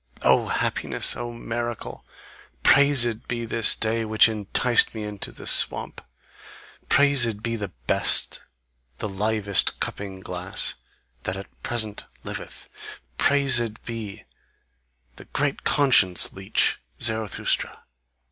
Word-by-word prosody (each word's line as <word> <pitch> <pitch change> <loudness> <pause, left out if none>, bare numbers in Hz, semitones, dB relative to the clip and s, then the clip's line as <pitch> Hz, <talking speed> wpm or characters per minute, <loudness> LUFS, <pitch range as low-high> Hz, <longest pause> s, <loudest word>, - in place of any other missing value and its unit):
O - - +3
happiness! - - 0
O 120 0 -6
miracle! 120 0 -6 0.6
Praised 130 -5 +4
be 120 -1 -4
this 115 -1 +3
day 115 +1 -1
which 110 0 +4
enticed 110 +3 +2
me 110 - -5
into 105 -1 -5
the - - -13
swamp! - - +2 0.9
Praised 120 -7 +4
be 115 0 -2
the 105 -3 -5 0.2
best, - - +3 0.6
the - - -5
livest 105 0 0
cupping 95 -2 -6
glass, 90 0 -3 0.5
that 95 +7 -5
at 100 - -13
present 110 -3 -2 0.2
liveth; - - -9 0.5
praised 130 -6 +3
be 110 -3 -7 0.9
the - - -13
great 145 -1 -3
conscience 125 - +2
leech 95 0 0 0.2
Zarathustra!" 110 -3 -2
110 Hz, 110 wpm, -23 LUFS, 105-120 Hz, 0.9 s, Praised